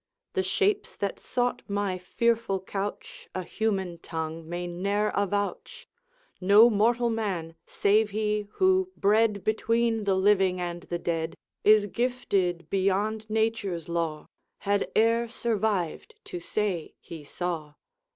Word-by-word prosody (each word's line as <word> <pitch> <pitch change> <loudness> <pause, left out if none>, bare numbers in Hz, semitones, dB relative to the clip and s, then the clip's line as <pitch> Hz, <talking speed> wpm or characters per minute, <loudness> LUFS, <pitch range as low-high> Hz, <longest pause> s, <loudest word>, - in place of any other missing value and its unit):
The 385 - +1
shapes 405 +1 0
that 200 -1 -3
sought 245 0 -1
my 200 -3 -1
fearful 230 +1 0
couch 195 +2 -6
A 185 - -2
human 190 -4 -2
tongue 160 -1 -5
may 175 +1 -3
ne'er 200 +4 0
avouch; 200 0 -2 0.5
No 205 +5 +7
mortal 235 +3 +2
man 190 -8 -2
save 210 +2 +2
he, 210 0 -1
who, 375 0 +3
bred 210 0 +3
Between 225 0 +1
the 195 -1 +3
living 190 -1 +3
and 175 -1 -4
the 175 - -1
dead, 165 -1 -2 0.3
Is 215 -1 +6
gifted 200 -7 -1
beyond 200 +4 0
nature's 215 -6 -1
law 165 -3 -2 0.4
Had 200 0 0
e'er 230 +1 +3
survived 220 -7 -1
to 175 - -6
say 185 -2 -2
he 160 -3 -10
saw. 155 -1 -4
200 Hz, 125 wpm, -27 LUFS, 180-220 Hz, 0.5 s, No